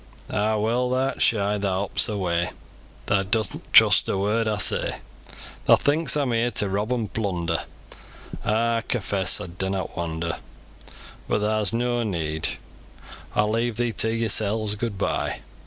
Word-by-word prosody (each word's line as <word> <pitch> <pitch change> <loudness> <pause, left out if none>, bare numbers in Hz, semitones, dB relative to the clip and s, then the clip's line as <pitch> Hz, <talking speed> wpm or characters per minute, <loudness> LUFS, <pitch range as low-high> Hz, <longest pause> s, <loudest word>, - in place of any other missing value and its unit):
"A'a 105 +1 +1
well! 120 +4 +1
tha'rt 130 +2 -1
shy, 105 -2 +2
tha 100 0 0
hops 95 +5 +1
away, 90 -4 -1 0.6
Tha 95 -1 +2
doesn't 105 +1 -2
trust - - +6
a - - 0
word 105 +3 +1
aw 105 -1 0
say; - - 0 0.7
Tha - - +7
thinks 150 +2 +2
aw'm 140 -4 0
here 115 +1 +1
to 105 -2 -1
rob 105 +4 -1
an' 120 -4 0
plunder, 85 -6 -2 0.8
An' 105 - +1 0.2
aw - - -6
confess 100 -6 0
aw - - -5
dunnot 95 +1 -3
wonder 85 -1 -3 0.9
But 105 - 0
tha's 105 -1 +1
noa 120 +1 0
need; 80 -6 -1 0.9
Aw'll 105 0 +2
leave 115 0 -1
yo 120 -1 +1
to 110 - +2
yorsels, 110 -1 +1
gooid 105 -1 -3
bye! - - -2
105 Hz, 150 wpm, -24 LUFS, 95-115 Hz, 0.9 s, Tha